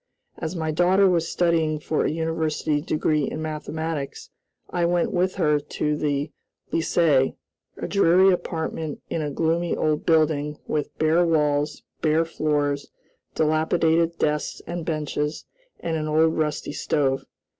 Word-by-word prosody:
As 165 +2 -4
my 160 -2 -1
daughter 185 +5 +4
was 170 -3 +2
studying 165 -3 +1
for 155 +1 -1
a - - +2
university 160 -2 -1
degree 155 -1 0
in - - -5
mathematics, 155 -1 -4 0.4
I 175 - 0
went 175 0 +1
with 185 +1 +1
her 150 -5 +2
to 150 +1 -2
the 145 0 -1 0.4
Lycée, 155 -5 +2 0.4
a - - -4
dreary 190 -1 +5
apartment 160 -3 -3
in 165 - -1
a 150 - -2
gloomy 165 +3 0
old 155 -1 0
building 155 -2 +2
with 150 -2 -3
bare 160 +3 +3
walls, 150 -3 +1 0.2
bare 160 +1 +2
floors, 145 -3 -1 0.5
dilapidated 160 +1 +2
desks 150 0 -1
and 170 -1 -5
benches, 150 -1 -2 0.4
and 165 -1 -2
an 155 -1 -2
old 160 +1 +3
rusty 150 -2 -2
stove. 135 -3 0
155 Hz, 135 wpm, -24 LUFS, 150-165 Hz, 0.5 s, dreary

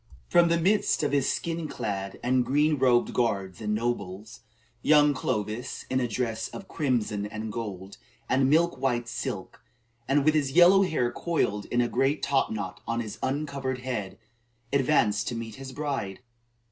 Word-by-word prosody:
From 175 -1 +5
the 170 0 +2
midst 200 0 +2
of 145 - +1
his 140 -2 +2
skin 165 -1 -3
clad 95 -7 -4
and 125 +1 +2
green 145 +4 +2
robed 125 -2 +3
guards 100 -6 -1
and 105 0 -1
nobles, 110 -1 -3 0.4
young 150 0 +5
Clovis 110 -2 -3
in 130 - +2
a 125 - 0
dress 115 -1 -2
of 195 - -9
"crimson 115 -8 -1
and 110 +1 -5
gold, 100 -4 -6 0.3
and 130 0 +2
milk 165 +2 +3
white 120 -3 0
silk," 115 - -5 0.4
and 140 +1 +2
with 155 - +5
his 140 -4 0
yellow 180 +4 +7
hair 155 -10 +1
coiled 110 -9 -1
in 120 - +1
a 120 - +1
great 135 +5 0
top 135 -1 +2
knot 110 -2 -5
on 115 0 -1
his 110 -3 -5
uncovered 135 -2 -2
head 105 -7 -4 0.6
advanced 125 -7 +2
to 120 - -2
meet 115 -1 -6
his 135 0 -8
bride. 135 -8 -4
125 Hz, 165 wpm, -27 LUFS, 110-145 Hz, 0.6 s, yellow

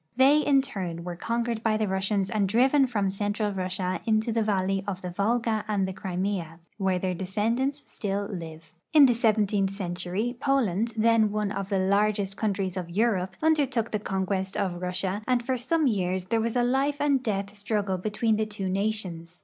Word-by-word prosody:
They 270 +4 +6
in 280 -3 +3
turn 180 -10 -5
were 175 0 -5
conquered 230 +4 -2
by 220 -1 +1
the 215 -1 0
Russians 190 +1 0
and 205 -4 +1
driven 265 +5 +4
from 205 -5 0
central 205 +1 -1
Russia 185 -1 -2
into 220 +1 +2
the 225 0 +1
valley 195 -2 0
of 190 -2 -4
the 180 - -4
Volga 220 +3 0
and 200 -3 0
the 190 - -4
Crimea, 185 -3 -3 0.2
where 190 -2 +1
their 185 0 -1
descendants 230 +10 -1
still 200 -1 -3
live. 165 -5 -8 0.2
In 300 -3 +9
the 250 - +4
seventeentli 210 -4 +1
century 185 +5 -3
Poland, 230 -6 +1
then 225 -1 +4
one 210 -1 -1
of 195 -2 -4
the 200 - +1
largest 200 +1 +1
countries 195 -3 -1
of 180 -2 -4
Europe, 190 -1 0
undertook 275 -8 +2
the 215 - 0
conquest 190 -1 -2
of 180 -3 -2
Russia, 185 +2 -2
and 250 -2 +2
for 260 +1 0
some 295 +6 0
years 185 -6 0
there 225 +4 0
was 230 +1 -2
a 245 - +3
life 270 +3 +1
and 285 -2 +2
death 200 -4 -2
struggle 205 -2 -1
between 215 +3 0
the 215 0 0
two 205 -3 -4
nations. 185 -4 -2
205 Hz, 185 wpm, -27 LUFS, 190-230 Hz, 0.2 s, In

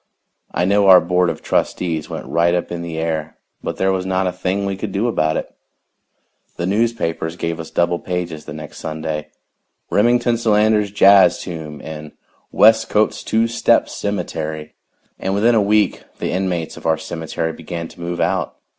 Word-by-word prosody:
I 90 - 0
know 100 +1 +3
our 95 -1 +9
board 90 +1 +1
of - - -5
trustees 80 -4 -1
went - - -6
right 85 +1 +2
up 90 - -2
in 85 -1 -4
the 85 -1 -5
air, 80 -1 -3 0.2
but - - -4
there 95 0 +2
was 95 -1 -1
not 95 0 0
a 90 - 0
thing 95 +2 -2
we 100 0 -2
could 100 +1 -5
do 100 +5 0
about 80 -9 +1
it. - - -5 1.0
The 85 - -2
newspapers 95 -6 -1
gave 85 -1 -3
us 80 - -7
double 85 0 +1
pages 90 -4 -4
the - - -7
next 75 -1 -9
Sunday 80 -1 -4 0.6
"Remington 120 +2 +3
Solander's 105 -2 +3
Jazz 100 -3 +6
Tomb" 80 -5 -7
and 75 -1 -8 0.4
"Westcote's 110 0 +4
Two 115 +1 +1
Step 115 - +2
Cemetery." 80 -6 -4 0.5
And 95 +1 -1
within 115 +4 +3
a 110 - +4
week 105 +1 +2 0.2
the - - -3
inmates 90 -3 -2
of - - -5
our 80 -1 +3
cemetery 80 0 -4
began 85 +1 -6
to 85 - -14
move 85 0 -4
out. - - 0
90 Hz, 175 wpm, -19 LUFS, 80-100 Hz, 1.0 s, our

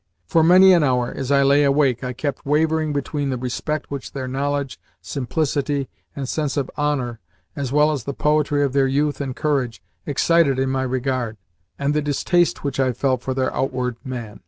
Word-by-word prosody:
For 160 - +3
many 185 +3 +7
an 175 - +5
hour, 125 -3 +1
as 135 -1 -4
I 140 -1 +4
lay 140 +1 +4
awake, 140 -3 +2
I 125 - -2
kept 135 +2 -4
wavering 155 +1 +1
between 145 0 -2
the 130 - -1
respect 135 +5 -3
which 140 -2 -6
their 130 -2 -4
knowledge, 140 +1 -2 0.2
simplicity, 145 0 -2 0.3
and 140 -2 -4
sense 150 +1 -2
of 135 -2 -2
honour, 135 -6 -1 0.4
as 135 -3 -3
well 150 +2 +4
as 135 -6 -4
the 140 - -3
poetry 150 -1 +1
of 135 -2 -1
their 135 -1 +3
youth 145 +1 0
and 130 -3 -4
courage, 135 -6 -1 0.3
excited 150 -1 +3
in 130 0 0
my 135 0 0
regard, 130 -3 -2 0.4
and 140 +1 0
the 150 - +1
distaste 170 +5 +1
which 140 -2 -3
I 130 -1 +2
felt 130 0 0
for 130 0 -3
their 130 -1 0
outward 125 -2 -1
man. 120 -6 -6
140 Hz, 190 wpm, -21 LUFS, 130-150 Hz, 0.4 s, many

